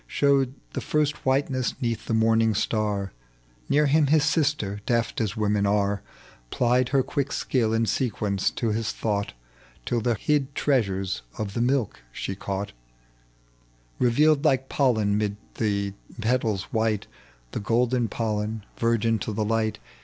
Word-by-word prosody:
Showed 135 Hz, -2 st, +2 dB, 0.2 s
the -, -, -3 dB
first 150 Hz, -2 st, -1 dB
whiteness 130 Hz, -1 st, +1 dB
'neath 115 Hz, -4 st, -2 dB
the 115 Hz, -, +1 dB
morning 110 Hz, 0 st, +3 dB
star; 105 Hz, -2 st, -1 dB, 0.6 s
Near 150 Hz, +1 st, +4 dB
him 145 Hz, +1 st, +4 dB
his 155 Hz, +1 st, +4 dB
sister, 145 Hz, -, 0 dB
deft, 115 Hz, -1 st, 0 dB
as 110 Hz, +1 st, -2 dB
women 105 Hz, -1 st, +1 dB
are, 100 Hz, 0 st, +1 dB, 0.5 s
Plied 125 Hz, -, +2 dB
her 135 Hz, -2 st, +3 dB
quick 140 Hz, +1 st, -2 dB
sldll 115 Hz, -5 st, 0 dB
in 115 Hz, 0 st, +2 dB
sequence 105 Hz, -3 st, 0 dB
to 115 Hz, -, -2 dB
his 110 Hz, +1 st, -1 dB
thought 100 Hz, -2 st, -2 dB, 0.5 s
Till 120 Hz, -1 st, 0 dB
the 120 Hz, 0 st, +1 dB
hid 140 Hz, +4 st, 0 dB
treasures 95 Hz, -, 0 dB, 0.2 s
of 105 Hz, -2 st, -3 dB
the 115 Hz, -, -1 dB
milk 125 Hz, -, 0 dB
she 95 Hz, -, -4 dB
caught 100 Hz, +1 st, -4 dB, 1.3 s
Eeyealed 145 Hz, +5 st, +4 dB
like 135 Hz, -4 st, +2 dB
pollen 110 Hz, -7 st, +2 dB
'mid 105 Hz, -1 st, -1 dB, 0.2 s
the 100 Hz, -2 st, 0 dB, 0.3 s
petals 110 Hz, -4 st, 0 dB
white, 110 Hz, -2 st, +1 dB, 0.5 s
The -, -, -3 dB
golden 120 Hz, +2 st, +1 dB
pollen, 110 Hz, -1 st, -2 dB
virgin 115 Hz, -1 st, +1 dB
to 110 Hz, -, -3 dB
the 105 Hz, +1 st, -1 dB
light. 110 Hz, 0 st, 0 dB
115 Hz, 145 wpm, -25 LUFS, 105-130 Hz, 1.3 s, Near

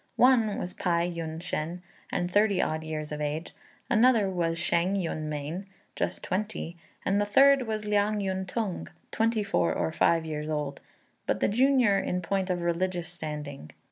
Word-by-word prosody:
One 235 Hz, -5 st, +4 dB
was 180 Hz, -, -3 dB
Pai 170 Hz, 0 st, 0 dB
Yün 160 Hz, -1 st, -4 dB
shên, 170 Hz, 0 st, -3 dB, 0.3 s
and 175 Hz, 0 st, -1 dB
thirty 205 Hz, -1 st, +3 dB
odd 155 Hz, 0 st, 0 dB
years 155 Hz, -1 st, -4 dB
of 150 Hz, 0 st, -4 dB
age; 150 Hz, +2 st, -3 dB, 0.3 s
another 235 Hz, -3 st, +4 dB
was 165 Hz, -2 st, 0 dB
Shêng 175 Hz, +3 st, +1 dB
Yün 160 Hz, -3 st, -2 dB
mien, 155 Hz, +6 st, -4 dB, 0.3 s
just -, -, -2 dB
twenty; 195 Hz, -3 st, -3 dB, 0.3 s
and 200 Hz, +2 st, +2 dB
the -, -, +2 dB
third 270 Hz, +4 st, +5 dB
was 215 Hz, -1 st, -2 dB
Liang 210 Hz, 0 st, +2 dB
Yün 190 Hz, -1 st, -2 dB
tung, 205 Hz, -2 st, -3 dB, 0.2 s
twenty 225 Hz, -1 st, +1 dB
four 200 Hz, -, +1 dB
or -, -, 0 dB
five 165 Hz, +1 st, +2 dB
years 150 Hz, -1 st, -4 dB
old, 150 Hz, -2 st, -3 dB, 0.5 s
but -, -, +1 dB
the -, -, +3 dB
junior 245 Hz, -3 st, +4 dB
in 180 Hz, -1 st, -2 dB
point 190 Hz, +2 st, -1 dB
of 175 Hz, -1 st, -1 dB
religious 175 Hz, 0 st, -1 dB
standing. 150 Hz, -, -6 dB
180 Hz, 170 wpm, -28 LUFS, 160-205 Hz, 0.5 s, third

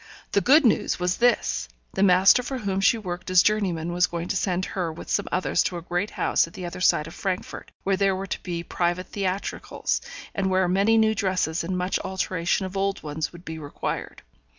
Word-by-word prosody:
The 200 Hz, -, +3 dB
good 290 Hz, +6 st, +5 dB
news 225 Hz, -, +2 dB
was 180 Hz, 0 st, 0 dB
this; 225 Hz, -, +1 dB, 0.2 s
the -, -, -1 dB
master 190 Hz, +4 st, +6 dB
for 260 Hz, +2 st, -4 dB
whom 195 Hz, -5 st, -2 dB
she 195 Hz, +4 st, +4 dB
worked 180 Hz, -5 st, -6 dB
as 185 Hz, -1 st, +6 dB
journeyman 180 Hz, -6 st, 0 dB
was 180 Hz, 0 st, +3 dB
going 170 Hz, 0 st, -5 dB
to -, -, 0 dB
send 185 Hz, -1 st, 0 dB
her 180 Hz, -4 st, -3 dB
with 160 Hz, -, -8 dB
some -, -, +1 dB
others 185 Hz, -, +1 dB
to 180 Hz, -, -2 dB
a 170 Hz, -, -7 dB
great 175 Hz, +4 st, -1 dB
house -, -, +1 dB
at 165 Hz, -, -15 dB
the 180 Hz, -, -6 dB
other 175 Hz, +1 st, -6 dB
side 155 Hz, -4 st, +3 dB
of 165 Hz, -, -9 dB
Frankfort, 185 Hz, -2 st, -4 dB
where 195 Hz, 0 st, +1 dB
there 195 Hz, -1 st, +2 dB
were 190 Hz, +1 st, -4 dB
to 195 Hz, -, -4 dB
be 170 Hz, -2 st, -4 dB
private 175 Hz, +1 st, -1 dB
theatricals, 195 Hz, -1 st, -2 dB, 0.3 s
and 190 Hz, -1 st, 0 dB
where 185 Hz, -1 st, +2 dB
many 200 Hz, +5 st, +3 dB
new 220 Hz, 0 st, +4 dB
dresses 185 Hz, -5 st, 0 dB
and 180 Hz, +2 st, -2 dB
much 180 Hz, +1 st, 0 dB
alteration 190 Hz, -1 st, -1 dB
of 185 Hz, +1 st, -7 dB
old 195 Hz, 0 st, -1 dB
ones 150 Hz, +1 st, -3 dB
would 175 Hz, 0 st, -14 dB
be 160 Hz, 0 st, -6 dB
required. 145 Hz, -2 st, -5 dB
185 Hz, 215 wpm, -25 LUFS, 175-195 Hz, 0.3 s, master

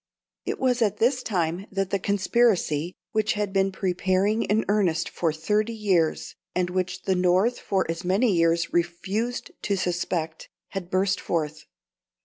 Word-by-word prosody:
It -, -, -1 dB
was 250 Hz, -2 st, +1 dB
at 210 Hz, -2 st, +2 dB
this 250 Hz, +4 st, +2 dB
time 180 Hz, -3 st, -1 dB
that 195 Hz, -1 st, -2 dB
the 200 Hz, -, +1 dB
conspiracy, 190 Hz, -5 st, +1 dB, 0.2 s
which 215 Hz, -1 st, +1 dB
had 205 Hz, -2 st, -2 dB
been 195 Hz, 0 st, +2 dB
preparing 190 Hz, +3 st, +1 dB
in 215 Hz, +1 st, +1 dB
earnest 190 Hz, -5 st, +1 dB
for 165 Hz, -2 st, -1 dB
thirty 210 Hz, +8 st, 0 dB
years, 185 Hz, -7 st, +1 dB, 0.2 s
and 180 Hz, -1 st, 0 dB
which 185 Hz, 0 st, -2 dB
the 190 Hz, -, +1 dB
North 185 Hz, +6 st, +2 dB
for 190 Hz, -1 st, 0 dB
as 165 Hz, +2 st, -4 dB
many 195 Hz, +4 st, +2 dB
years 165 Hz, 0 st, +2 dB
refused 190 Hz, +8 st, -1 dB
to 200 Hz, -1 st, 0 dB
suspect, 175 Hz, -3 st, -2 dB, 0.2 s
had 190 Hz, -3 st, -5 dB
burst 190 Hz, +1 st, +1 dB
forth. 155 Hz, -2 st, -2 dB
190 Hz, 150 wpm, -25 LUFS, 175-210 Hz, 0.2 s, at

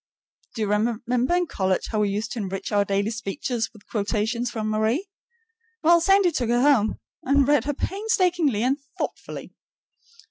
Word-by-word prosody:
Do 225 Hz, -, -1 dB
you -, -, -1 dB
remember 240 Hz, +7 st, +1 dB
in 355 Hz, -, +1 dB
college 190 Hz, -, -1 dB
how 215 Hz, -, 0 dB
we 210 Hz, -1 st, +2 dB
used 210 Hz, +3 st, -3 dB
to 240 Hz, -, -4 dB
enrich 195 Hz, -2 st, -4 dB
our 205 Hz, -1 st, +3 dB
daily 200 Hz, +2 st, 0 dB
speech 225 Hz, +3 st, -5 dB
with 225 Hz, -3 st, -3 dB
quotations 220 Hz, +3 st, -1 dB
from 220 Hz, -2 st, -3 dB
Marie? 220 Hz, -, 0 dB, 0.8 s
Well, 340 Hz, +1 st, +6 dB
Sandy 390 Hz, 0 st, +4 dB
took 245 Hz, -7 st, -1 dB
her 240 Hz, +1 st, +3 dB
home 255 Hz, -7 st, +3 dB, 0.2 s
and 275 Hz, 0 st, +3 dB
read 290 Hz, -4 st, +3 dB
her 290 Hz, -1 st, -1 dB
painstakingly 360 Hz, -, +1 dB
and 270 Hz, +3 st, +1 dB, 0.2 s
thoughtfully. -, -, -5 dB
235 Hz, 165 wpm, -24 LUFS, 215-290 Hz, 0.8 s, Well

